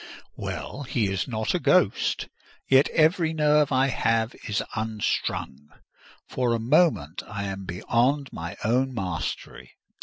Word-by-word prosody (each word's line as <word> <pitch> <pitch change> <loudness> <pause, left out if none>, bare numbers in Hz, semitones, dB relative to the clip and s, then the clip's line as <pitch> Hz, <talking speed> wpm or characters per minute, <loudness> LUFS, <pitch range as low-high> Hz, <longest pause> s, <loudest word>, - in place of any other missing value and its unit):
Well, 140 - -5
he 115 -7 -1
is 95 - -2
not 110 -3 -1
a - - +1
ghost; - - +2 0.4
yet 135 +2 +5
every 160 +1 +3
nerve 150 -2 +3
I 130 0 +3
have 115 -2 +1
is 105 - 0
unstrung: 105 -9 -2 0.6
for 125 -2 0
a - - -2
moment 120 - +2
I 105 -1 -5
am 95 -1 -5
beyond 125 +10 0
my 85 +2 -6
own 125 +4 +1
mastery. 80 - -5
115 Hz, 130 wpm, -25 LUFS, 100-140 Hz, 0.6 s, yet